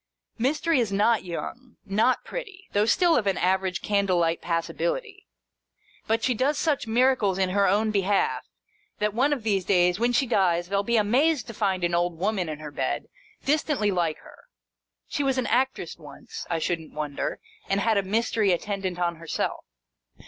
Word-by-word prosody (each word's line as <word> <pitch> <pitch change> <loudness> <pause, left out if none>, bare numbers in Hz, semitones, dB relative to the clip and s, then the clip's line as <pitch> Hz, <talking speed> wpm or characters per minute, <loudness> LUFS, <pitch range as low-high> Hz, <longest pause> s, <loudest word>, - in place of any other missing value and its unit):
Mystery 305 +5 +1
is 225 -4 0
not 210 +2 +2
young, 230 +8 -7
not 220 +6 +1
pretty, 395 -6 -7
though 205 +2 +2
still 345 +5 +4
of 215 -4 +1
an 195 - +1
average 185 0 0
candle 200 -3 +1
light 165 -1 +1
passability; 395 - -3 0.8
but 225 +1 +1
she 255 - +2
does 270 +5 +1
such 285 -6 0
miracles 230 -4 +2
in 190 -1 +1
her 200 +1 +2
own 215 +2 +2
behalf, 200 -1 +1 0.6
that, 210 -1 0
one 265 +6 +2
of 275 -6 -1
these 200 -4 +1
days, 180 0 +3
when 240 +1 +2
she 250 +3 +2
dies, 180 -7 +1
they'll 200 0 +1
be 235 +3 +1
amazed 250 +6 +2
to 230 - -8
find 195 -4 -1
an 175 0 +1
old 175 -1 0
woman 190 -1 -1
in 155 - -4
her 150 -1 -8
bed, - - -2 0.4
distantly 280 -7 +1
like 170 -4 0
her. - - -16 0.6
She 290 - -2
was 270 -1 +1
an 255 - 0
actress 245 -9 0
once, 145 -3 -10
I 165 - 0
shouldn't 165 -1 -3
wonder, 150 -2 -3 0.3
and 195 +1 +2
had 220 0 +2
a - - +2
Mystery 215 0 +1
attendant 190 0 -2
on 170 -1 -1
her 165 0 -12
self. - - -2
205 Hz, 180 wpm, -26 LUFS, 180-250 Hz, 0.8 s, still